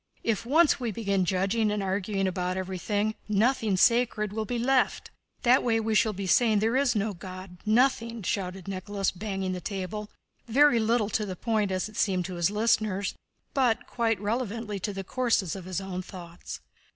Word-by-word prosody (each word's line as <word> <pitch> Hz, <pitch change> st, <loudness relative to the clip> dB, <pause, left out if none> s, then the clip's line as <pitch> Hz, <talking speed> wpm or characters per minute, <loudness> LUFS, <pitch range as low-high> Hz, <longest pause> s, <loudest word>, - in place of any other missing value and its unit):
If 225 Hz, 0 st, -1 dB
once 315 Hz, +3 st, +4 dB
we 245 Hz, -2 st, -2 dB
begin 200 Hz, -3 st, 0 dB
judging 195 Hz, +5 st, +1 dB
and 210 Hz, -1 st, -1 dB
arguing 195 Hz, +1 st, -1 dB
about 180 Hz, 0 st, -2 dB
everything, 205 Hz, +3 st, -1 dB, 0.2 s
nothing 215 Hz, -1 st, +2 dB
sacred 220 Hz, -2 st, +3 dB
will 220 Hz, 0 st, -2 dB
be 240 Hz, +3 st, -2 dB
left! 255 Hz, +2 st, +1 dB, 0.3 s
That 250 Hz, +2 st, +5 dB
way 225 Hz, -2 st, +2 dB
we 225 Hz, 0 st, -1 dB
shall 215 Hz, 0 st, +3 dB
be 195 Hz, -1 st, -5 dB
saying 220 Hz, +3 st, +4 dB
there 220 Hz, +4 st, +1 dB
is 265 Hz, -3 st, +2 dB
no 210 Hz, 0 st, 0 dB
God—nothing!" 215 Hz, +6 st, -1 dB
shouted 185 Hz, 0 st, -3 dB
Nicholas, 195 Hz, +1 st, -2 dB
banging 195 Hz, -1 st, -3 dB
the 180 Hz, -1 st, -4 dB
table—very 215 Hz, -, 0 dB
little 220 Hz, -1 st, +1 dB
to 215 Hz, -, 0 dB
the 185 Hz, -, -4 dB
point 215 Hz, 0 st, 0 dB
as 185 Hz, +1 st, -1 dB
it 215 Hz, -, -12 dB
seemed 185 Hz, -4 st, +1 dB
to 185 Hz, -, -5 dB
his 175 Hz, 0 st, +2 dB
listeners, 210 Hz, -2 st, +1 dB, 0.4 s
but 250 Hz, -5 st, +2 dB
quite 225 Hz, -4 st, 0 dB
relevantly 215 Hz, -1 st, -2 dB
to 205 Hz, -, -3 dB
the 195 Hz, -1 st, -5 dB
course 225 Hz, -5 st, 0 dB
of 190 Hz, -3 st, -8 dB
his 185 Hz, 0 st, -3 dB
own 190 Hz, -1 st, -4 dB
thoughts. 175 Hz, -, -9 dB
210 Hz, 175 wpm, -27 LUFS, 190-230 Hz, 0.4 s, That